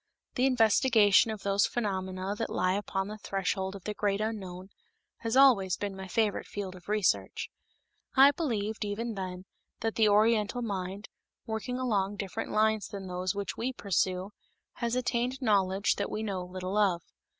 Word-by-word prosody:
The 255 Hz, +1 st, +2 dB
investigation 225 Hz, -3 st, +5 dB
of 215 Hz, -2 st, -5 dB
those 200 Hz, 0 st, +3 dB
phenomena 190 Hz, -3 st, -2 dB
that 225 Hz, -, -3 dB
lie 185 Hz, 0 st, +1 dB
upon 195 Hz, -1 st, -2 dB
the 215 Hz, +1 st, -7 dB
threshold 195 Hz, -1 st, -2 dB
of 195 Hz, -, -10 dB
the 210 Hz, -, -3 dB
great 205 Hz, -1 st, 0 dB
unknown 190 Hz, -4 st, -4 dB, 0.5 s
has 230 Hz, +2 st, -1 dB
always 200 Hz, -10 st, +5 dB
been 200 Hz, -1 st, -4 dB
my 190 Hz, 0 st, -7 dB
favorite 210 Hz, +2 st, 0 dB
field 195 Hz, -2 st, -5 dB
of 180 Hz, +2 st, -14 dB
research. 210 Hz, -3 st, 0 dB, 0.6 s
I 275 Hz, +1 st, +8 dB
believed, 220 Hz, -, -2 dB
even 220 Hz, +3 st, -3 dB
then, 185 Hz, -2 st, -5 dB, 0.4 s
that 225 Hz, -1 st, 0 dB
the 220 Hz, -2 st, +4 dB
Oriental 215 Hz, +3 st, +3 dB
mind, 195 Hz, -1 st, -4 dB, 0.4 s
working 220 Hz, +3 st, -3 dB
along 205 Hz, -6 st, 0 dB
different 195 Hz, -2 st, -4 dB
lines 215 Hz, 0 st, +2 dB
than 195 Hz, -1 st, -7 dB
those 180 Hz, +1 st, -2 dB
which 200 Hz, 0 st, -4 dB
we 255 Hz, +3 st, -2 dB
pursue, 190 Hz, -2 st, -1 dB, 0.5 s
has 235 Hz, 0 st, -1 dB
attained 250 Hz, +1 st, -1 dB
knowledge 200 Hz, -4 st, +2 dB
that -, -, -2 dB
we 215 Hz, -, -3 dB
know 190 Hz, -4 st, -3 dB
little 185 Hz, +2 st, -4 dB
of. 180 Hz, -5 st, +2 dB
205 Hz, 160 wpm, -30 LUFS, 190-225 Hz, 0.6 s, I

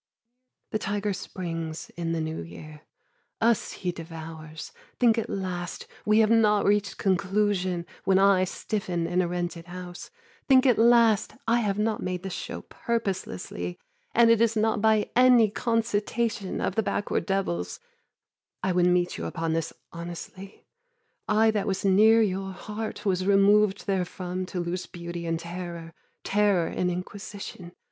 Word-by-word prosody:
The 215 Hz, -, 0 dB
tiger 205 Hz, 0 st, -1 dB
springs 165 Hz, -4 st, -5 dB
in 165 Hz, 0 st, -2 dB
the 165 Hz, -, -1 dB
new 160 Hz, -, -3 dB
year. 150 Hz, -, -10 dB, 0.6 s
Us 230 Hz, 0 st, +2 dB
he 180 Hz, -, -3 dB
devours. 160 Hz, -2 st, -8 dB, 0.3 s
Think 235 Hz, -2 st, +4 dB
at 225 Hz, -, -4 dB
last 180 Hz, -2 st, -4 dB, 0.2 s
We 215 Hz, 0 st, +5 dB
have 220 Hz, 0 st, +3 dB
not 210 Hz, -2 st, +4 dB
reached 205 Hz, 0 st, +1 dB
conclusion, 190 Hz, -2 st, +1 dB, 0.2 s
when 190 Hz, -1 st, +3 dB
I 195 Hz, -1 st, +5 dB
Stiffen 180 Hz, -3 st, -3 dB
in 180 Hz, +2 st, +1 dB
a 180 Hz, -, 0 dB
rented 175 Hz, -1 st, -3 dB
house. 175 Hz, 0 st, -8 dB, 0.4 s
Think 265 Hz, -1 st, +6 dB
at 250 Hz, -4 st, +4 dB
last 230 Hz, -2 st, +4 dB
I 235 Hz, +1 st, +4 dB
have 205 Hz, -3 st, 0 dB
not 215 Hz, +1 st, 0 dB
made 180 Hz, 0 st, -3 dB
this 190 Hz, -2 st, -4 dB
show 240 Hz, +5 st, -5 dB
purposelessly 185 Hz, -, -3 dB, 0.4 s
And 230 Hz, 0 st, +6 dB
it 230 Hz, -1 st, +4 dB
is 230 Hz, -1 st, +3 dB
not 220 Hz, -1 st, +1 dB
by 220 Hz, -1 st, +3 dB
any 245 Hz, -4 st, +6 dB
concitation 225 Hz, -2 st, -1 dB
Of -, -, 0 dB
the 220 Hz, -, +1 dB
backward 205 Hz, -1 st, -1 dB
devils. 190 Hz, -, -1 dB, 0.8 s
I 190 Hz, -, +1 dB
would 180 Hz, 0 st, +3 dB
meet 180 Hz, 0 st, +1 dB
you -, -, -4 dB
upon 165 Hz, -1 st, -2 dB
this 165 Hz, 0 st, -1 dB, 0.2 s
honestly. 175 Hz, +3 st, -8 dB, 0.6 s
I 220 Hz, +1 st, +4 dB
that 210 Hz, -2 st, -1 dB
was 195 Hz, 0 st, -1 dB
near 220 Hz, +4 st, +6 dB
your 195 Hz, -1 st, -2 dB
heart 215 Hz, +3 st, -6 dB
was 185 Hz, -1 st, +1 dB
removed 200 Hz, 0 st, +4 dB
therefrom 185 Hz, -1 st, -2 dB
To 180 Hz, -, -4 dB
lose 175 Hz, +1 st, -3 dB
beauty 170 Hz, -1 st, -6 dB
in 165 Hz, 0 st, 0 dB
terror, 170 Hz, -1 st, -7 dB, 0.3 s
terror 200 Hz, -4 st, +2 dB
in 180 Hz, -, -1 dB
inquisition. 180 Hz, 0 st, -7 dB
190 Hz, 150 wpm, -27 LUFS, 175-210 Hz, 0.8 s, Think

